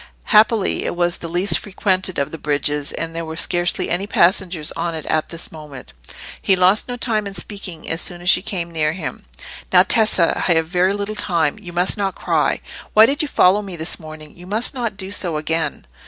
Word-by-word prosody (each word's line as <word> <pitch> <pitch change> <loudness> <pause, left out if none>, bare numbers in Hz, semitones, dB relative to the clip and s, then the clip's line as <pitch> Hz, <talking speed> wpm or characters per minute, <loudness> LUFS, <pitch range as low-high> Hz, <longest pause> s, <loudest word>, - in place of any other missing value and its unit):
Happily 215 -1 +4
it - - -3
was 175 0 +1
the 170 - -6
least 175 +1 +1
frequented 190 -2 0
of 140 - -1
the 165 - -7
bridges, 145 0 -1
and 165 0 -5
there 165 - -3
were 160 0 -6
scarcely 175 +1 0
any 190 +3 0
passengers 180 -5 +1
on 170 0 -3
it 160 - -6
at 155 -1 0
this 165 0 -8
moment. 150 - -11 0.5
He 195 - +3
lost 185 +3 +3
no 245 0 -5
time 220 -4 -1
in 195 - -8
speaking 180 -3 -5
as 165 - -1
soon 175 - -4
as 175 - -9
she 185 - +5
came 175 -4 -4
near 155 -2 0
him. 185 - -6 0.5
"Now, - - +7
Tessa, 215 -7 +3
I - - +6
have 160 0 +1
very 180 +3 +1
little 205 +1 -3
time. 170 -5 0
You 180 -4 -9
must 180 +4 +1
not 195 -2 -1
cry. - - 0 0.3
Why 215 +1 +9
did 280 +5 0
you 305 - -1
follow 200 -6 +4
me 195 -3 -7
this 160 0 -2
morning? 155 -2 -10
You 175 +1 -12
must 215 +5 +1
not 235 -6 -3
do 190 -1 -6
so 175 -6 -1
again." 160 - -2
175 Hz, 215 wpm, -20 LUFS, 165-200 Hz, 0.5 s, Why